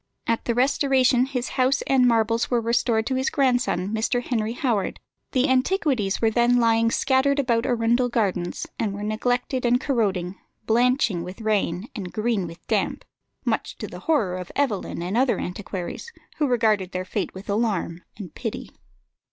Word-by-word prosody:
At 230 0 -1
the 235 - 0
Restoration 260 -1 +3
his 255 -2 -3
house 260 +1 +1
and 260 -2 +3
marbles 230 0 +2
were 245 - +2
restored 230 -1 +1
to 265 - -1
his 260 0 0
grandson, 245 -9 +1
Mr. 230 +3 0
Henry 225 -3 -1
Howard; 240 -6 -1 0.3
the 260 0 +2
antiquities 260 - +1
were 225 -1 +2
then 240 +2 +3
lying 230 -1 +3
scattered 270 +3 +2
about 240 -4 +1
Arundel 240 +1 +2
Gardens, 190 -7 -1
and 205 -3 -1
were 205 - -6
neglected 245 +4 -1
and 245 0 +3
corroding, 195 -9 -1 0.3
blanching 235 -5 +2
with 185 +5 -8
rain, 210 -2 0
and 190 -6 -5
green 215 -4 -1
with 165 +1 -12
damp, - - -1 0.4
much - - -1
to - - -5
the - - -9
horror 205 - +2
of 180 - -8
Evelyn 215 -10 -1
and 185 +4 -3
other 255 +1 +3
antiquaries, 185 - -5 0.3
who 295 - +1
regarded 215 -7 +1
their 185 0 -3
fate 195 +1 -3
with 190 +2 -9
alarm 200 -5 -1 0.2
and 185 -7 -8
pity. 225 -4 -5
230 Hz, 165 wpm, -24 LUFS, 200-255 Hz, 0.4 s, Restoration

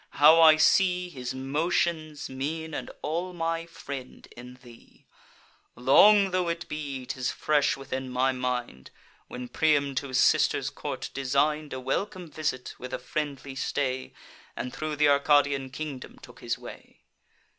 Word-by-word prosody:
how 155 +3 +7
I 160 -1 +9
see 180 +2 +3
His 130 -5 -6
motions, 155 +3 -1
mien, 155 +4 -4
and - - -5
all 175 +4 -2
my 165 -1 -2
friend, 140 -5 -9
in 125 +1 -11
thee! 120 -2 -17 0.7
Long 195 +10 +6
tho' 180 -1 0
it 170 0 -4
be, 140 -4 -5
'tis 130 0 -2
fresh 150 -3 +1
within 130 -1 -5
my 130 +1 +1
mind, 125 -1 -4 0.4
When 125 0 -7
Priam 145 -1 +1
to 140 - -1
his 130 -1 0
sister's - - +3
court - - -6
design'd 140 +3 0
A 130 - -4
welcome 170 +6 -3
visit, 150 -5 -3
with 130 +1 -5
a - - -3
friendly 140 -3 -4
stay, 130 -1 -2 0.4
And 125 - -5
thro' 155 -1 -3
th' 150 - 0
Arcadian 145 -1 +3
kingdom 140 -1 -7
took - - -14
his - - -3
way. - - -12
145 Hz, 145 wpm, -27 LUFS, 130-160 Hz, 0.7 s, I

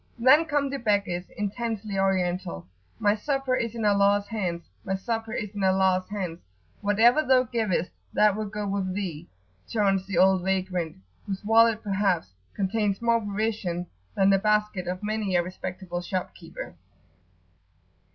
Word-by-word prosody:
Then 265 +7 +6
come 290 -3 0
the 275 - -3
beggars, 200 -5 0
intensely 210 0 -3
Oriental. 180 - 0 0.3
"My 205 0 +3
supper 270 +4 -1
is 230 -2 -2
in 225 -2 -2
Allah's 200 0 +3
hands, 180 -6 -3 0.2
my 190 0 -1
supper 225 +2 -3
is 210 -3 -3
in 205 -1 -3
Allah's 190 -1 +2
hands! 185 -5 -4 0.4
whatever 225 +7 +4
thou 260 -2 +4
givest, 220 -8 -1 0.2
that 210 -2 +4
will 215 0 -3
go 210 0 -4
with 195 -2 -2
thee!" 175 -5 -4 0.4
chaunts 195 -3 +1
the 195 -3 -2
old 190 +1 +5
vagrant, 185 -3 -1 0.3
whose 195 +1 -4
wallet 225 0 +4
perhaps 195 - 0 0.2
contains 200 0 0
more 235 0 +2
provision 205 -4 -2 0.3
than 195 0 +4
the 195 - +4
basket 210 -3 +1
of 185 +2 -4
many 210 -3 -1
a 175 - +3
respectable 180 0 -5
shopkeeper. 185 +1 -5
200 Hz, 145 wpm, -26 LUFS, 185-220 Hz, 0.4 s, Then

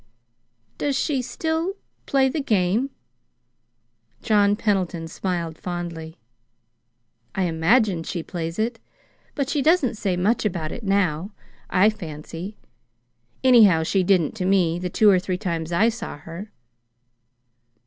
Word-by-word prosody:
"Does 285 -2 0
she 275 -3 0
still 320 +7 -2 0.3
play 270 -1 +3
the 290 +3 -2
game?" 215 +2 +1 1.3
John 205 -2 +3
Pendleton 185 -6 -1
smiled 170 -2 -3
fondly. 170 -2 -6 1.2
"I 190 - +1
imagine 175 +3 +2
she 165 0 -4
plays 165 -2 -5
it, 225 +1 -1 0.6
but 280 -3 -1
she 285 0 0
doesn't 275 -7 +3
say 190 -4 0
much 210 +6 +1
about 175 -7 -2
it - - -6
now, 195 -2 0 0.4
I 195 +4 +4
fancy. 170 +1 -8 0.9
Anyhow, 215 -11 +6
she 190 +4 +1
didn't 180 -4 +2
to 185 - -2
me, 180 -3 +2
the 180 0 -3
two 215 +4 +3
or 185 - +4
three 185 0 -3
times 170 -4 -3
I 210 +7 +4
saw 230 -7 -6
her." 165 +7 -9
190 Hz, 130 wpm, -23 LUFS, 170-225 Hz, 1.3 s, Anyhow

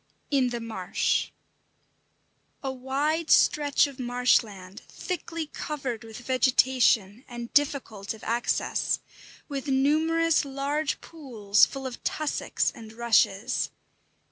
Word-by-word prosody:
X: - - -44 0.2
IN 265 -3 +3
THE 240 -1 -4
MARSH 220 -6 -1 1.3
A 270 - -2
wide 285 +5 -1
stretch 290 -1 +4
of 280 -2 -9
marshland, 230 -6 0
thickly 335 -2 -5
covered 270 -6 -5
with 225 -1 -10
vegetation, 255 -4 +3
and 240 -1 -8
difficult 265 -8 0
of 220 - -16
access, 235 +1 0 0.5
with 280 -1 -5
numerous 310 +5 +2
large 280 +2 -2
pools, 225 -10 +2
full 270 -1 -7
of 255 -2 -7
tussocks 305 -2 -1
and 220 -1 -11
rushes. 225 -3 +2
260 Hz, 110 wpm, -27 LUFS, 230-290 Hz, 1.3 s, stretch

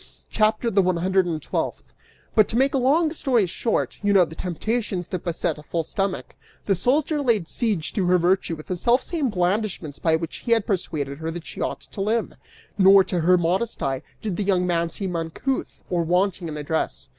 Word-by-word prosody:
CHAPTER 220 +2 +2
THE 195 - +4
ONE 185 -1 +1
HUNDRED 185 +1 +2
AND 160 -2 -2
TWELFTH. - - -3 0.4
"But 215 -2 +5
to 230 - -1
make 270 +1 +3
a 270 - +2
long 305 +6 +3
story 255 - +1
short, 220 +6 -2
you 205 0 +2
know 185 -3 +6
the 160 - -11
temptations 190 +3 -2
that 180 0 -5
beset 170 -2 -1
a - - -10
full 165 +2 -2
stomach: 195 +4 -3 0.3
the 200 - +3
soldier 285 - +1
laid 225 - +1
siege 205 -9 -1
to 190 -4 0
her 180 0 +5
virtue 180 -1 +1
with 155 - -11
the 185 - -3
selfsame 255 - +1
blandishments 180 -5 -1
by 160 -1 +2
which 160 0 -4
he 235 - +1
had 225 -2 +1
persuaded 150 -8 -2
her 160 0 -3
that 170 0 -6
she - - -8
ought - - -2
to 195 - -8
live. 220 +3 0 0.5
Nor, 195 0 +8
to 180 - -2
her 180 +3 +4
modest 185 +7 -1
eye, 135 -1 -1 0.2
did 205 -5 -2
the 210 - 0
young 185 -2 +2
man 170 -1 0
seem 185 +1 -4
uncouth 165 +11 -3
or 175 -1 0
wanting 180 +1 +1
in 155 -1 -5
address. 145 - -2
185 Hz, 205 wpm, -24 LUFS, 170-220 Hz, 0.5 s, Nor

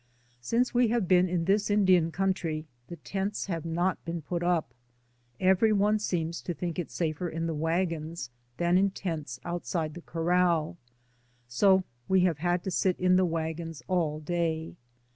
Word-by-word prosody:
Since 235 - +1
we 245 0 +4
have 225 -4 0
been 180 0 +4
in 170 -2 0
this 200 +3 +2
Indian 185 -5 +4
country 170 -3 -1 0.2
the 170 - -7
tents 195 +5 -3
have 170 -4 -4
not 175 +2 -1
been 165 -1 -4
put 170 +3 -3
up; 175 -8 0 0.7
every 190 +4 +4
one 210 +1 +3
seems 170 -4 -2
to 175 - -4
think 175 0 -3
it 175 - -3
safer 165 +1 -2
in 165 +1 -3
the 165 - -1
wagons 165 -3 -2 0.3
than 175 +1 +3
in 200 +1 +3
tents 160 -10 -5
outside 170 -2 -2
the 175 - -9
corral, 170 -1 +1 0.7
so 190 +10 +4 0.2
we 190 -1 +4
have 175 -5 +1
had 175 +1 0
to 190 - -3
sit 185 +1 +1
in 180 0 +4
the 185 0 +4
wagons 165 -1 -3
all 165 -5 0
day. 160 0 -2
175 Hz, 165 wpm, -28 LUFS, 165-185 Hz, 0.7 s, we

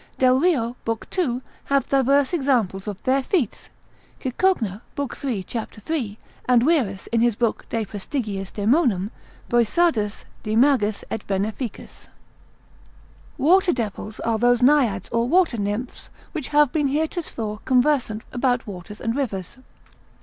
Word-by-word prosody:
Delrio, 255 -2 +3
lib. 225 -1 -2
2. 270 -10 0 0.3
hath 275 -1 +1
divers 275 +2 +3
examples 240 - +1
of 205 -2 -6
their 265 +1 +2
feats: 270 - -1 0.5
Cicogna, 250 - 0 0.2
lib. 285 -3 -2
3. 240 -9 -3
cap. 225 +4 -5
3. 220 -2 -3 0.3
and 245 -2 +4
Wierus 250 - +1
in 230 -1 +2
his 240 -2 +3
book 230 0 -1
de 225 -2 -1
praestig. 210 +6 -4 0.3
daemonum. 210 - +2 0.4
Boissardus 235 -2 +1 0.2
de 215 0 -2
magis 230 -5 +3
et - - -2
veneficis. 210 +4 -4 1.3
Water 350 +6 +4
devils 215 -2 -4
are 225 -1 0
those 245 +1 +3
Naiads 245 -9 +3
or 230 0 +1
water 340 -9 +3
nymphs 205 +5 -4 0.2
which 305 -6 -4
have 295 -3 +4
been 295 -3 +1
heretofore 280 - -2
conversant 250 -4 +2
about 245 -1 +1
waters 200 +1 -8
and 230 0 -1
rivers. 205 -8 -3
240 Hz, 130 wpm, -23 LUFS, 215-280 Hz, 1.3 s, and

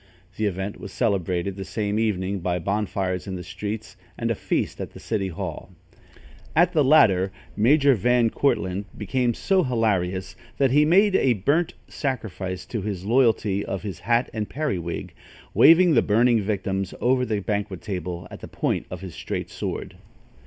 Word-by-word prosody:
The 110 - 0
event 95 +1 -4
was 100 - -8
celebrated 95 -4 0
the 95 - -4
same 105 +1 -2
evening 100 -3 0
by 90 0 -1
bonfires 95 0 -2
in 95 - -4
the 90 - -6
streets 105 +4 -6 0.2
and - - -1
a - - +3
feast - - -2
at - - -6
the - - -11
city 105 -4 -2
hall. 85 - -6 0.9
At 175 +3 +4
the 155 -3 +4
latter, 100 -10 +5 0.2
Major 140 +5 +5
Van 120 +1 +2
Cortlandt 100 -7 0
became 120 +3 0
so 195 -1 +2
hilarious, 95 - 0 0.2
that 135 -3 +3
he 150 +2 +5
made 195 +5 +4
a 130 -8 +4
burnt 145 - 0
sacrifice 95 - -4
to 110 +2 -4
his 95 -2 -4
loyalty 110 -4 +2
of 95 - -4
his 100 -6 -5
hat 120 +1 +1
and 105 -2 -3
periwig, 95 - -3 0.4
waving 170 +1 +7
the 120 - +5
burning 115 +2 +3
victims 95 -2 -2
over 125 +1 +2
the 110 -4 -1
banquet 100 -2 -3
table 90 -4 -4
on - - -7
the - - -7
point - - -2
of - - -7
his 95 -3 -7
straight - - -5
sword. - - -5
105 Hz, 165 wpm, -24 LUFS, 95-125 Hz, 0.9 s, waving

